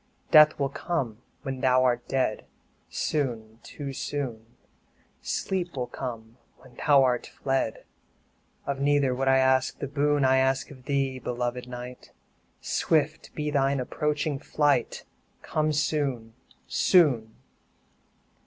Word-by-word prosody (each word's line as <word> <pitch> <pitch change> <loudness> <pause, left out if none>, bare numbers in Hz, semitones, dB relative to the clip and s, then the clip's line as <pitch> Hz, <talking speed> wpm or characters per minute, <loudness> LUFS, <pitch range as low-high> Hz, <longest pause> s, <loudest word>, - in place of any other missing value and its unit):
5 - - -29
Death 155 -1 +7
will 140 -1 +1
come 135 -8 -3 0.2
when 135 -3 -4
thou 130 0 +4
art 120 -1 +1
dead, 130 -5 -1 0.4
Soon, 115 -7 -2
too 140 -2 -7
soon 120 -5 -5 0.6
Sleep 180 -3 -2
will 125 - -1
come 120 -2 -7 0.2
when 130 -2 -18
thou 140 +2 +4
art 125 -2 +1
fled; 135 -5 -2 0.8
Of 140 -1 -2
neither 140 -2 +2
would 135 +1 -2
I 135 0 +5
ask 130 0 +2
the 140 - -4
boon 145 0 +1
I 130 0 +4
asked 130 0 +1
of 130 -3 -14
thee, 135 -2 -1
beloved 125 0 -3
Night 125 0 -9 0.5
Swift 155 -1 0
be 150 -1 -2
thy 140 -1 +2
approaching 145 +2 -1
flight, 145 -4 0 0.4
Come 155 0 0
soon, 140 -6 -1 0.3
soon! 125 - +3
135 Hz, 125 wpm, -27 LUFS, 125-145 Hz, 0.8 s, Death